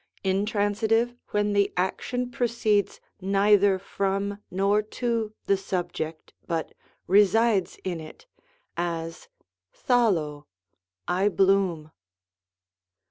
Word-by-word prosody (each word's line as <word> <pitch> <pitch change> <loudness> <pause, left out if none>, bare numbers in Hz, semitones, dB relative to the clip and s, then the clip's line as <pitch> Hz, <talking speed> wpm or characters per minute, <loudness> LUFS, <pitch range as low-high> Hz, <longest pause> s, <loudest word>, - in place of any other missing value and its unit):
Intransitive, 210 +4 +1 0.2
when 205 0 0
the 200 -1 +2
action 245 +7 -1
proceeds 230 -4 0 0.2
neither 200 0 +4
from 200 +1 -2
nor 200 +3 +2
to 225 0 -2
the 200 - +3
subject, 175 -4 -4
but 165 -1 -2 0.3
resides 205 +1 +3
in 180 -3 -3
it, 155 - -12 0.5
as, 165 - -4 0.6
d^aXXcoy 170 - +2 0.3
" 90 - -65 0.2
I 190 +3 +2
bloom.'' 190 -5 +1
200 Hz, 90 wpm, -26 LUFS, 180-210 Hz, 0.6 s, neither